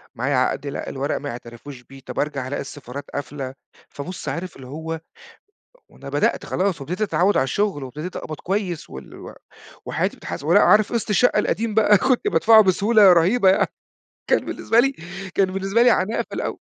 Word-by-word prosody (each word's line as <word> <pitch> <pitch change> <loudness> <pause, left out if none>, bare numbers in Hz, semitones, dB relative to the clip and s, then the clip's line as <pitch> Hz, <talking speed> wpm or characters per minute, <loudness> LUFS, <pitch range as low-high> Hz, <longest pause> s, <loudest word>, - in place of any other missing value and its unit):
معايا 130 +4 -1
عقد 130 +2 0
لأ، 140 - -5
الورق 135 +1 -2
ما 145 - -5
يعترفوش 120 +2 -9
بيه. 135 +1 -14
طب، - - -5
أرجع 140 -3 -2
ألاقي 145 - -3
السفارات 140 0 -8
قافلة، 135 -1 -5 0.4
فبُص، 175 +6 -7
عارف 180 0 -5
اللي 130 -2 -11
هو 160 +3 -6 0.9
وأنا - - -11
بدأت - - 0
خلاص 185 -5 -1
وابتديت 180 +9 -5
أتعود 200 -1 +2
على - - +3
الشغل 190 -1 -1
وابتديت 150 +7 -7
أقبض 155 - -5
كويّس 190 -3 -3
وال 65 0 -10
و - - -10 0.5
وحياتي - - -1
بتتحسن 140 - -7
ولأ، 190 +5 +6
عارف 210 +2 +4
قسط 230 -2 -2
الشقّة 210 +1 +3
القديم 220 +1 -1
بقى، 210 -1 +5
كنت 260 - +1
بادفعه 225 - +6
بسهولة 200 +1 +5
رهيبة 190 +5 +4
يعني، 190 - +3 0.6
كان - - +2
بالنسبة 230 - +1
لي 275 +2 +2 0.4
كان 190 -1 +2
بالنسبة 195 +4 +1
لي 245 - +6
عناء 220 0 +1
في - - -10
الأوّل. - - -4
180 Hz, 180 wpm, -22 LUFS, 140-210 Hz, 0.9 s, ولأ